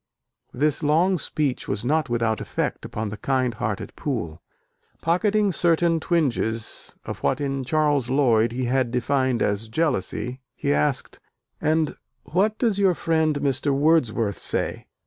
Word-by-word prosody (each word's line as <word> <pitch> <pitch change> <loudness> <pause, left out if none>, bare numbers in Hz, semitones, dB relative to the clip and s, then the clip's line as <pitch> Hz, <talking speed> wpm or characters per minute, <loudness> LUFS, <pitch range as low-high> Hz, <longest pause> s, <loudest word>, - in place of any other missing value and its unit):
This 150 +4 +1
long 165 +5 +3
speech 145 -4 -1
was 100 +3 -2
not 150 +1 +1
without 115 -2 0
effect - - -3
upon 110 0 -4
the 110 - -6
kind 130 -1 0
hearted 105 -2 -4
Poole. 100 - -4 0.6
Pocketing 205 +4 +2
certain 170 -1 +2
twinges 120 -10 -1
of - - -5
what - - 0
in 135 -2 -2
Charles 145 -2 +1
Lloyd 120 -5 +3
he 125 +1 -2
had 130 0 +1
defined 130 +1 +1
as 105 +2 -1
jealousy, 125 - -1
he 70 - 0
asked, 75 +1 0 0.4
"And 155 0 +1 0.3
what 205 +6 +1
does 220 -5 +1
your 190 -3 +4
friend 160 -3 +1
Mr. 140 +1 +1
Wordsworth 125 -9 +2
say? - - -2
135 Hz, 140 wpm, -24 LUFS, 115-160 Hz, 0.6 s, your